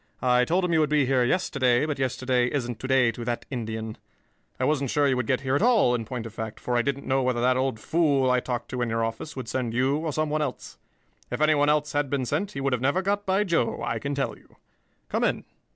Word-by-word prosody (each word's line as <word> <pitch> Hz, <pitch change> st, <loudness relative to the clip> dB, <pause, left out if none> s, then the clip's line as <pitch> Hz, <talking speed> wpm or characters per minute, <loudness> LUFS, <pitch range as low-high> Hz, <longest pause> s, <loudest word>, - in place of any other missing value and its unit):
I 125 Hz, 0 st, +4 dB
told 180 Hz, +6 st, +1 dB
him 175 Hz, -, 0 dB
you 160 Hz, -, +4 dB
would 155 Hz, -2 st, +2 dB
be 150 Hz, -2 st, +3 dB
here 130 Hz, -1 st, +2 dB
yesterday, 130 Hz, -4 st, +2 dB
but 150 Hz, -3 st, -3 dB
yesterday 130 Hz, -1 st, +1 dB
isn't 120 Hz, -5 st, -3 dB
to 130 Hz, -, -5 dB
day 130 Hz, -3 st, +4 dB
to 120 Hz, +1 st, -7 dB
that 120 Hz, 0 st, -3 dB
Indian. 110 Hz, -3 st, -4 dB, 0.6 s
I -, -, -1 dB
wasn't 140 Hz, -2 st, +1 dB
sure 145 Hz, +2 st, +2 dB
you 135 Hz, -, +2 dB
would 125 Hz, -3 st, -2 dB
get 130 Hz, -, +1 dB
here 130 Hz, -1 st, -1 dB
at -, -, +1 dB
all, 225 Hz, -, +4 dB
in 115 Hz, -2 st, -2 dB
point 120 Hz, -1 st, -5 dB
of 115 Hz, -, -8 dB
fact, 110 Hz, -1 st, -6 dB
for 125 Hz, -, -2 dB
I 120 Hz, -, +4 dB
didn't 140 Hz, +2 st, -3 dB
know 135 Hz, 0 st, +1 dB
whether 125 Hz, -2 st, 0 dB
that 125 Hz, +1 st, +3 dB
old 130 Hz, -3 st, -1 dB
fool 140 Hz, -2 st, +2 dB
I 125 Hz, -, +3 dB
talked 120 Hz, -1 st, -4 dB
to 125 Hz, -, -3 dB
in 120 Hz, -, 0 dB
your 115 Hz, 0 st, 0 dB
office 115 Hz, +7 st, -6 dB
would 130 Hz, -3 st, -6 dB
send 120 Hz, -2 st, -2 dB
you 130 Hz, +3 st, +2 dB
or 160 Hz, 0 st, -2 dB
some 155 Hz, +1 st, -1 dB
one 155 Hz, 0 st, 0 dB
else. 140 Hz, -4 st, -5 dB, 0.5 s
If -, -, -3 dB
anyone 150 Hz, -1 st, +3 dB
else 150 Hz, 0 st, +1 dB
had 145 Hz, -1 st, 0 dB
been 135 Hz, -2 st, -1 dB
sent, 155 Hz, +11 st, -2 dB
he 140 Hz, -, -4 dB
would 135 Hz, -1 st, 0 dB
have 125 Hz, -, -1 dB
never 140 Hz, +9 st, +1 dB
got 205 Hz, +1 st, -1 dB
by 190 Hz, +2 st, +2 dB
Joe, 170 Hz, -, 0 dB
I 115 Hz, -, -2 dB
can 140 Hz, +5 st, -3 dB
tell 140 Hz, -, -2 dB
you. -, -, -23 dB, 0.5 s
Come -, -, -1 dB
in. -, -, 0 dB
130 Hz, 265 wpm, -26 LUFS, 120-150 Hz, 0.6 s, I